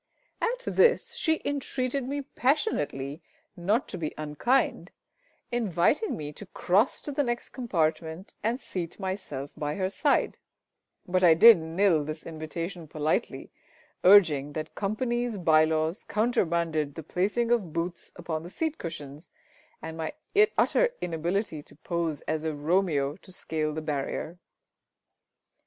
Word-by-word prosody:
At - - -1
this 475 +1 +3
she 320 -1 0
entreated 270 -2 -2
me 285 +1 -3
passionately 155 - -1 0.3
not 205 +8 0
to - - -4
be 155 -2 -3
unkind, 155 - 0 0.6
inviting 235 - +1
me 150 -1 -6
to 200 +6 -10
cross 195 +5 +1
to 290 - -5
the 290 +1 0
next 240 -3 -2
compartment 165 -6 -2
and 230 +4 0
seat 175 -8 -5
myself 185 -8 -4
by 150 0 -3
her 190 -1 -1
side; 285 +6 +1 0.7
but 185 +1 +1
I 165 -2 +7
did 225 +3 +9
nill 165 0 +2
this 155 +1 -6
invitation 165 +2 -5
politely, 155 +1 -2 0.5
urging 155 -8 +6
that 155 +1 -5
Company's 235 +2 -1
bye 155 -3 +5
laws 160 +2 -1
countermanded 170 - 0
the 160 - -6
placing 210 +9 0
of 210 -9 +1
boots 170 +2 -4
upon 170 -3 -4
the 170 - -9
seat 315 - -2
cushions, 150 -2 -7 0.5
and 160 0 -6
my 160 -1 -3 0.4
utter - - +3
inability 170 0 -2
to - - -16
pose 165 -1 -2
as 155 0 -2
a 160 -1 -2
Romeo 150 -2 +1
to 185 - -14
scale 160 -4 -2
the 155 +1 -5
barrier. 155 +3 -3
170 Hz, 135 wpm, -28 LUFS, 155-225 Hz, 0.7 s, did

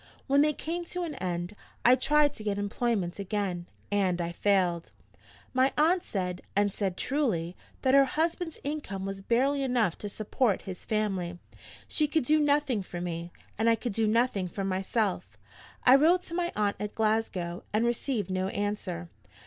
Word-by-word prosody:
When 280 +1 +4
they 300 +1 +4
came 335 +4 -4
to 360 +1 -4
an 325 -3 -4
end, 180 -5 -3 0.3
I 245 - +8
tried 295 +3 +3
to 215 - -9
get 205 -2 -1
employment 205 -3 -1
again, 195 -3 -2 0.2
and 190 -3 +1
I 170 0 -2
failed. 180 -2 +1 0.6
My 260 +1 +3
aunt 335 +4 +4
said, 180 -2 -3
and 205 -1 +2
said 190 -3 -2
truly, 190 - 0 0.3
that 260 -1 +3
her 275 0 +7
husband's 325 +3 -1
income 275 -10 -4
was 195 0 -5
barely 265 +7 +2
enough 245 -9 +1
to 205 - -4
support 215 +1 0
his 185 -2 -8
family: 195 -5 -1 0.5
she 305 - +2
could 310 0 +1
do 310 +5 +3
nothing 290 -6 +2
for 180 -2 -7
me, 170 -1 -4 0.3
and 225 +1 +4
I 230 - +5
could 225 0 -4
do 220 +1 +1
nothing 220 -4 +2
for 195 +3 -4
myself. 195 +2 -1 0.5
I 255 - +8
wrote 345 +5 +4
to 335 - -7
my 345 0 0
aunt 205 -1 0
at 210 0 -4
Glasgow, 215 -6 0
and 215 +3 +2
received 235 -4 -1
no 185 0 0
answer. 200 -4 -3
215 Hz, 175 wpm, -29 LUFS, 190-275 Hz, 0.6 s, I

